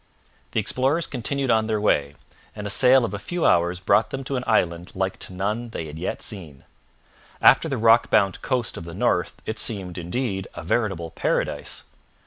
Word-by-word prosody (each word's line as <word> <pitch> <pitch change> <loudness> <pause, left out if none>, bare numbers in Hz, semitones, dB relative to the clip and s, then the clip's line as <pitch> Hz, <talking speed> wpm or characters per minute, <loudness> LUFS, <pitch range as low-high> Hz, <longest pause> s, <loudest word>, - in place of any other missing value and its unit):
The - - +2
explorers 135 +9 +1
continued 135 +1 -2
on 110 -1 +2
their 110 -1 0
way, 70 -9 +1 0.4
and 105 -1 -6
a 105 - -1
sail 130 0 +6
of 105 - -5
a 100 - -4
few 175 +10 -2
hours 85 +1 +3
brought 100 +4 +3
them 135 0 -5
to 135 +1 -3
an 125 - -2
island 85 -5 0
like 95 0 -2
to - - -8
none 105 +6 -2
that 115 - -11
they 80 - -4
had 75 +1 -8
yet 90 - -3
seen. 80 - -6 0.8
After - - +5
the - - -1
rock 115 +1 +5
bound 95 -2 +2
coast 125 -3 -1
of 85 - -7
the 85 0 -8
north - - 0
it 110 0 -4
seemed, 95 -5 -3
indeed, 95 +2 -3
a - - -7
veritable 85 -3 -1
paradise. - - -2
105 Hz, 195 wpm, -24 LUFS, 90-120 Hz, 0.8 s, sail